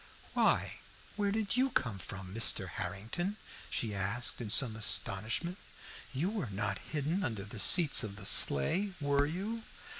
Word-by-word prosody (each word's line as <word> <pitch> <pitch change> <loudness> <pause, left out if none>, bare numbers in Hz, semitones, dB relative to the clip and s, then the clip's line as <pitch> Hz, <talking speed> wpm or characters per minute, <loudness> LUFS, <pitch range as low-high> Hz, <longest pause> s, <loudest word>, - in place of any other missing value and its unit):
"Why, - - 0 0.4
where 205 -1 -1
did 215 0 -2
you 260 +2 +1
come 115 - -2
from, 95 +1 -9
Mr. 110 -3 +2
Harrington?" 110 - -5 0.3
she 110 -3 -3
asked 100 +6 -2
in 110 - -6
some 110 +1 +2
astonishment. 115 - 0 0.5
"You 155 +9 -2
were 195 - -4
not 100 +2 -3
hidden 155 +6 -3
under 110 - -4
the 105 +2 -8
seats 160 - +8
of 100 -3 -6
the 100 -1 -9
sleigh, 180 - +3
were 145 -1 +1
you?" 200 +8 -5
125 Hz, 150 wpm, -32 LUFS, -, 0.5 s, seats